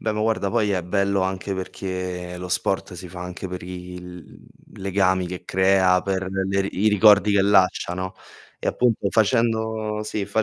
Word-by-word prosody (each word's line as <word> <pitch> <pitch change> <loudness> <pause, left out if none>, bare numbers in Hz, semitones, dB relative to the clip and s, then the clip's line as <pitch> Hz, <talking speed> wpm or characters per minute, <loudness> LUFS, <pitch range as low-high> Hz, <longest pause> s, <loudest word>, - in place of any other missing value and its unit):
Beh, 110 - -1
ma 105 - -3
guarda, 110 -3 0
poi 110 -2 +1
è 95 -3 0
bello 100 +2 0
anche 95 +1 -2
perché 90 -1 -5
lo 90 0 -6
sport 90 +1 -1
si 90 +1 -9
fa 90 +1 -9
anche 90 +1 -6
per 90 -1 -6
il 90 -1 -9
mhmm, - - -18
legami 95 -1 +1
che 90 0 -7
crea, 95 -1 +3
per 95 -1 -2
le 95 0 0
i 105 +4 +1
ricordi 105 -1 +5
che 100 -1 +4
lascia, 95 -3 +3
no, 95 +1 -4 0.4
e - - -5
appunto 115 -5 +1
facendo 110 -1 +1
sì, 105 -1 -3
fa 110 - +1
95 Hz, 180 wpm, -23 LUFS, 90-105 Hz, 0.4 s, ricordi